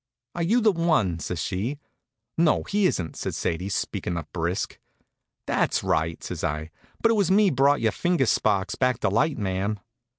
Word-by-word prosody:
"Are 175 - -4
you 220 +9 +3
the 215 -1 +5
one?" 155 - +1
says 90 0 -4
she. 105 - -2 0.6
"No, 165 -1 +3
he 200 -1 +2
isn't," 85 - -2
says - - -4
Sadie, 90 +4 -2
speakin' 90 -2 -2
up 80 -2 -7
brisk. 85 +1 -2 0.7
"That's - - +1
right," 80 +1 0
says - - -5
I; 75 +2 -2 0.3
"but 230 - +5
it - - +3
was 200 -5 +2
me 200 +1 +5
brought 140 +2 +3
your 110 -1 +2
finger 175 -6 +1
sparks 100 -4 +1
back 125 -2 +1
to - - +2
light, 130 +10 +1
ma'am." 100 +1 -2
115 Hz, 175 wpm, -25 LUFS, -, 0.7 s, the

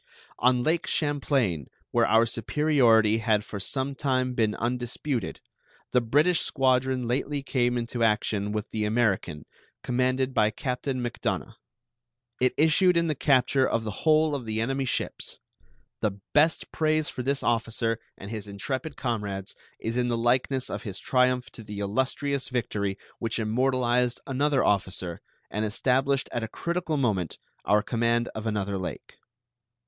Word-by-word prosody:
On 125 +1 +3
Lake 165 +4 +1
Champlain, 135 - 0 0.2
where - - +3
our 115 +1 +5
superiority 115 -3 +3
had 110 -2 +1
for 105 - -6
some 135 +7 -2
time 130 -2 0
been 110 -4 +1
undisputed, 120 0 -2 0.5
the 125 - +4
British 150 +9 +3
squadron 130 -2 +1
lately 140 +3 -1
came 125 -2 +1
into 120 0 -2
action 105 -2 +1
with 105 0 -2
the 110 - -1
American, 105 -8 0 0.4
commanded 130 +1 +1
by 105 -3 +4
Captain 125 +3 -3
Macdonough. 120 - -3 0.9
It 130 0 +2
issued 170 +3 +4
in 170 - +3
the - - +2
capture 135 -1 +3
of 115 - 0
the 110 - -3
whole 155 -1 +4
of 135 -4 -3
the 110 0 -2
enemy's 135 +3 -1
ships. - - -3 0.6
The 100 -2 -1
best 150 +2 +3
praise 155 -1 +1
for - - -4
this 140 +2 -1
officer 115 0 0 0.2
and 100 +2 -8
his 105 -2 -5
intrepid 130 - -4
comrades 100 -5 -3 0.2
is 115 +2 -3
in 125 0 +1
the 120 -1 0
likeness 125 +2 +1
of - - -4
his 100 -6 -6
triumph 125 -1 +1
to 115 - -11
the 105 -1 -8
illustrious 130 +6 -1
victory 105 -5 -2 0.2
which 115 -1 -2
immortalized 125 +1 +1
another 140 0 +1
officer 95 -3 0 0.3
and 105 - -1
established 130 +5 +1
at 120 - -2
a - - -2
critical 170 +3 -2
moment 100 - 0 0.3
our 105 +1 +3
command 120 0 +1
of 110 +1 -5
another 100 -2 -1
lake. 90 - -6
125 Hz, 150 wpm, -27 LUFS, 110-135 Hz, 0.9 s, our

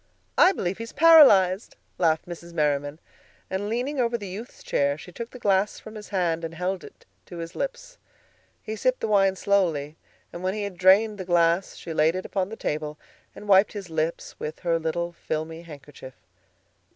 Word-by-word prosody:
"I 365 - +6
believe 190 - -3
he's 230 0 -7
paralyzed," 220 - +6 0.2
laughed 160 -2 +2
Mrs. 170 0 -9
Merriman. 145 -2 0 0.5
And 195 +2 -2
leaning 255 +5 -2
over 235 -1 +1
the 205 - -8
youth's 205 +7 -9
chair, 140 0 0
she 180 - -11
took 230 +6 -7
the - - -11
glass 200 -3 +1
from 220 - -11
his 210 -1 -10
hand 170 -4 0
and 165 0 -5
held 180 +2 -2
it - - -14 0.2
to 175 - -9
his 165 +1 -7
lips. - - -5 0.6
He 220 - -5
sipped 255 +4 0
the - - -1
wine 195 -2 +3
slowly, 165 -7 0 0.4
and 175 - -7
when 185 +2 -1
he 210 - -3
had 200 -2 -5
drained 205 +3 +5
the - - -3
glass 175 +1 +2
she 165 - -7
laid 160 +2 +3
it 185 - -4
upon 190 -2 -2
the 220 - -6
table 150 -5 -3 0.4
and 210 - -10
wiped 195 0 +5
his 195 -5 -7
lips 160 +1 -3
with 150 - -6
her 170 -2 +1
little 170 +2 -2
filmy 160 -1 -5
handkerchief. 145 -5 -12
185 Hz, 190 wpm, -25 LUFS, 165-210 Hz, 0.6 s, I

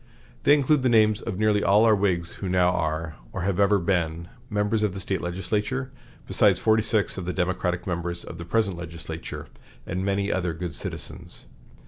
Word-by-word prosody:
They 145 - +7
include 145 0 +3
the 130 - +2
names 110 -1 +4
of 110 -5 -4
nearly 105 -1 +2
all 105 +3 +5
our 110 - +6
Whigs 90 -4 0
who 95 - -2
now 90 -1 +3
are, 80 -2 -2
or - - -4
have 100 0 0
ever 100 +1 +5
been, 85 -3 -1 0.2
members 105 0 0
of 105 -3 0
the - - -4
State 95 +1 -1
legislature, 105 +9 -2 0.3
besides - - +4
forty 110 0 +3
six 110 -3 0
of 90 - -5
the 90 - -2
Democratic 90 0 -1
members 85 -1 -3
of 85 - -9
the 85 - -6
present 100 -1 0
legislature, 85 -1 -7 0.4
and 95 +1 -3
many 100 +1 0
other 90 -3 -1
good 85 -1 -5
citizens. - - -7
95 Hz, 185 wpm, -25 LUFS, 85-105 Hz, 0.4 s, They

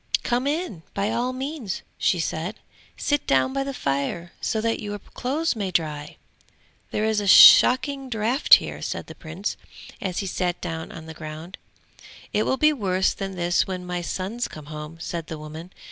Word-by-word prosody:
'Come 245 +3 0
in, 295 - -2
by 200 +2 0
all 240 +2 0
means!' 260 - -4 0.2
she 180 - +2
said; 165 +4 -2 0.4
'sit 290 -1 0
down 135 - +3
by 275 0 0
the 275 - -4
fire 155 - -2
so 220 - 0
that 225 +1 0
your 205 0 -4
clothes 275 - -2
may 200 -4 -2
dry!' 150 -4 -2 0.7
'There 215 - -1
is 220 -1 +2
a 205 - -3
shocking 260 +6 +7
draught 235 +5 +5
here,' - - -4
said - - -4
the - - -10
Prince, 170 +5 -5 0.4
as 185 -3 -3
he 200 - -1
sat 180 -1 -1
down 165 -2 -5
on 165 -1 -9
the 160 - -8
ground. 160 +3 -8 0.7
'It 215 - +1
will 265 - +1
be 305 +2 +4
worse 190 -7 +1
than 195 -1 -5
this 175 0 +1
when 185 -1 -4
my 180 0 -3
sons 195 +7 -3
come 155 -2 -10
home!' 150 +2 -7
said 170 -1 -5
the 160 - -6
woman. 155 +4 -9
190 Hz, 180 wpm, -24 LUFS, 165-245 Hz, 0.7 s, shocking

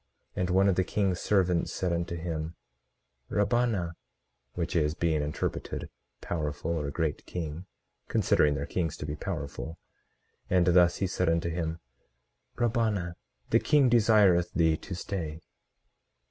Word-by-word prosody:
18:13 - - -1
And 90 - 0
one 95 +2 +4
of 95 - +3
the 95 - +4
king's 95 -2 0
servants 90 -4 +2
said 90 -2 -1
unto 85 0 -2
him, 80 -1 -4 0.7
Rabbanah, 105 -4 +1 0.6
which 85 0 -3
is, 75 -2 +2
being 80 -3 +1
interpreted, 75 +1 -3 0.3
powerful 75 -1 -3
or 75 -4 -1
great 80 0 -2
king, 85 0 -5 0.4
considering 75 -1 +3
their 70 +1 -2
kings 80 -2 -2
to - - -5
be 75 - -3
powerful; 80 -1 -5 0.7
and 90 -1 +4
thus 90 -1 +5
he 100 - 0
said 90 -2 0
unto 85 0 +1
him: 80 0 -3 0.7
Rabbanah, 110 -7 0 0.4
the - - +6
king 145 -4 +4
desireth 105 -7 +5
thee 80 -2 +4
to 95 - -7
stay. 85 -4 -4
85 Hz, 140 wpm, -29 LUFS, 80-95 Hz, 0.7 s, the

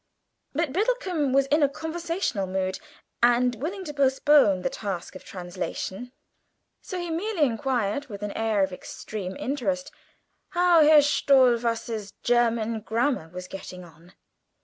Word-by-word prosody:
But 305 -2 -1
Biddlecomb 375 - 0
was 275 +1 +4
in 300 +2 +4
a 285 - +4
conversational 320 - -3
mood, 190 0 -2 0.4
and 245 +1 +4
willing 380 +6 -3
to 295 - -6
postpone 270 -7 +4
the - - +1
task 195 -5 -5
of 185 - -10
translation, 185 +5 -6 0.7
so 370 - -6
he 350 -2 -4
merely 355 +1 0
inquired, 250 0 0
with 205 -3 -8
an 210 - -3
air 220 -2 +1
of 190 -1 -2
extreme 190 0 -7
interest, 275 +1 -2 0.7
how 350 -2 +6
Herr 300 -1 +7
Stohwasser's 235 -6 +2
German 230 -2 +2
Grammar 225 - -1
was 180 +1 -8
getting 185 -1 -8
on. 170 +1 -17
245 Hz, 135 wpm, -26 LUFS, 200-295 Hz, 0.7 s, Herr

